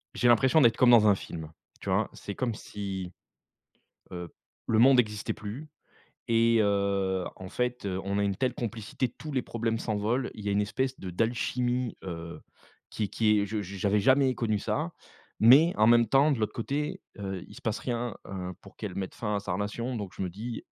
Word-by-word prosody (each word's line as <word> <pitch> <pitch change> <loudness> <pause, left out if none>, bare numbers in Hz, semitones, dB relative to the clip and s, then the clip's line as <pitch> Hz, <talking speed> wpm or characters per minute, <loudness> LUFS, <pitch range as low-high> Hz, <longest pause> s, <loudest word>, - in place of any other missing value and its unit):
J'ai 125 - +2
l'impression 130 +7 +5
d'être 115 -3 +5
comme 125 - +5
dans 110 -3 +7
un 100 - +6
film, 80 -4 -8 0.3
tu - - -5
vois, - - +1
c'est 100 - -7
comme 120 -3 -1
si, 95 -4 -6 1.0
heu, 90 -2 -6 0.4
le 110 - +2
monde 130 +1 +7
existait 105 -3 0
plus 110 +9 -7 0.6
et 115 0 +4
heu, 100 -2 +1
en 95 0 -8
fait, 125 0 -2
heu, 95 -1 -2
on 100 +1 0
a - - +2
une 100 -1 0
telle 130 -2 0
complicité, 115 +2 -3
tous 155 +5 -9
les 130 - +1
problèmes 115 -1 -2
s'envolent, 110 +4 -1
il 105 -1 -9
y - - 0
a - - +1
une 100 - +2
espèce 130 +5 -2
de 95 - -6
d'alchimie, 120 +4 -1
heu, 85 -2 -7 0.5
qui 110 - -2
est - - -4
qui 105 0 +3
est 100 - 0
je 105 +1 -2
je 100 +2 -8
j'avais 100 +2 +2
jamais 130 +2 +4
connu 110 -3 0
ça, 160 - -2 0.5
mais 145 +9 +8
en 110 +1 +5
même 120 0 +6
temps, 140 +6 +4
de 135 - +1
l'autre 110 - -1
côté, 150 +9 -3 0.2
heu, 95 -2 -4
il - - -14
se - - -12
passe 110 -1 -1
rien, 120 -2 -3
heu, 90 -2 -5
pour - - -16
qu'elle 100 -4 -5
mette 95 -1 -4
fin 105 -2 -1
à - - -1
sa 95 -2 -3
relation, 105 +6 -3
donc 100 -4 -6
je - - -6
me 90 - -2
dis: 110 +6 -6
110 Hz, 210 wpm, -28 LUFS, 100-125 Hz, 1.0 s, mais